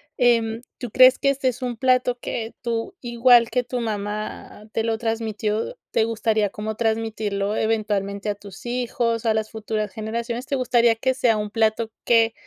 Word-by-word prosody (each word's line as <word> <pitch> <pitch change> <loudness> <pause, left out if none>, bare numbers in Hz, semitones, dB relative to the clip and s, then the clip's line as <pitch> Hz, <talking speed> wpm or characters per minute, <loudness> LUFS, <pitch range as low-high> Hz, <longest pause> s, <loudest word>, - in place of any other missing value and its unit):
em, 230 -2 +2 0.2
¿tú 245 -3 -6
crees 255 +2 +6
que 275 - +2
este 270 -1 +1
es 250 +1 -6
un 245 -2 -2
plato 250 0 +2
que 225 -1 -5
tú, 230 -1 -3
igual 240 -1 +5
que 250 -1 0
tu 245 0 -3
mamá 210 -1 -4
te 225 - -1
lo 225 -1 0
transmitió, 225 - -2 0.2
te 220 - +2
gustaría 220 -2 +1
como 215 +2 -5
transmitirlo 220 -2 -1
eventualmente 210 -2 -1
a 205 - -1
tus 200 +1 -13
hijos, 240 -1 -1
a 220 - +3
las 220 0 -2
futuras 215 -2 -3
generaciones? 230 +4 -4
¿Te 275 - -1
gustaría 240 -2 +3
que 260 +3 0
sea 250 -3 +2
un 210 -1 -2
plato 220 0 +1
que 230 -1 +4
225 Hz, 175 wpm, -23 LUFS, 215-240 Hz, 0.2 s, crees